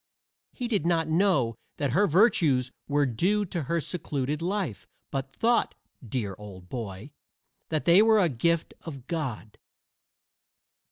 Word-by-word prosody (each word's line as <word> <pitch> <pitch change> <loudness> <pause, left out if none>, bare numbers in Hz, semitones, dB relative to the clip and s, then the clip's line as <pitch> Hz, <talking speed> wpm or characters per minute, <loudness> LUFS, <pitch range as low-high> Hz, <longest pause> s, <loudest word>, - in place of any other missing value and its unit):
He 245 - -4
did 210 -9 0
not 165 -2 +1
know 160 - +2 0.2
that 140 -3 -1
her 200 +9 +3
virtues 155 - +3 0.2
were 145 0 +2
due 185 - +1
to 175 -2 -3
her 170 +5 -1
secluded 150 -3 -3
life, 180 - -3 0.2
but 135 0 -3
thought, 235 - +1 0.3
dear 110 -4 -3
old 95 -3 -11
boy, 110 +1 -6 0.6
that 155 -2 -1
they 175 +4 +7
were 220 0 +5
a 190 -4 +4
gift 165 +5 0
of 140 -7 -9
God. 130 -10 -4
155 Hz, 135 wpm, -27 LUFS, 125-180 Hz, 0.6 s, they